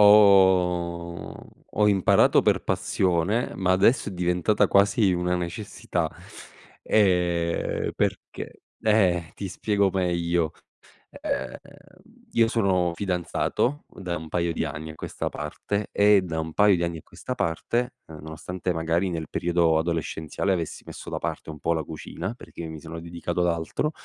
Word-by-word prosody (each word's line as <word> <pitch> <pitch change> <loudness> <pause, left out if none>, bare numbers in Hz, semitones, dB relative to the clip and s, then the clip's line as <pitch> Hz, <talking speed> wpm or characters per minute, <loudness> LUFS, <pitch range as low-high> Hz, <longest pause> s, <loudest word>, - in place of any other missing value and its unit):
ho 90 -4 +4 0.3
ho 105 - +3
imparato 95 -3 +5
per - - +2
passione, 95 +6 0
ma 95 -1 0
adesso 100 +7 +3
è 100 - -6
diventata 90 +3 +2
quasi 100 0 +4
una 90 0 0
necessità. 90 +4 -3 0.7
E 90 -4 +1
perché? - - -3 0.2
Eh, 90 -6 +2
ti 100 - -5
spiego 100 +1 +1
meglio. 85 -3 0 0.7
Ehm, - - -2 0.8
io 115 -1 +4
sono 95 -6 +2
fidanzato 95 - -1
u - - -15
da 90 -2 -2
un 80 -1 -7
paio 85 0 0
di - - -1
anni 80 0 -5
a - - -12
questa - - -4
parte 100 +7 -3
e 100 -1 +5
da 85 -3 -3
un 80 0 -4
paio 105 +1 +5
di 85 - -1
anni 85 -1 -2
a - - -15
questa - - -6
parte, 120 +9 -1
ehm, 80 -1 -10
nonostante 85 +4 -4
magari 85 +3 0
nel 80 -3 -4
periodo 85 -2 +2
adolescenziale 80 +3 -1
avessi 85 -4 -4
messo - - -9
da - - -3
parte - - -4
un 75 -1 -8
po' 85 - +1
la 80 -1 -1
cucina, 80 +6 -6
perché 85 -8 -9
mi 80 -1 -7
sono 80 +1 -8
dedicato 85 +1 -3
ad 90 - +3
altro, 85 - -1
90 Hz, 150 wpm, -25 LUFS, 85-100 Hz, 0.8 s, imparato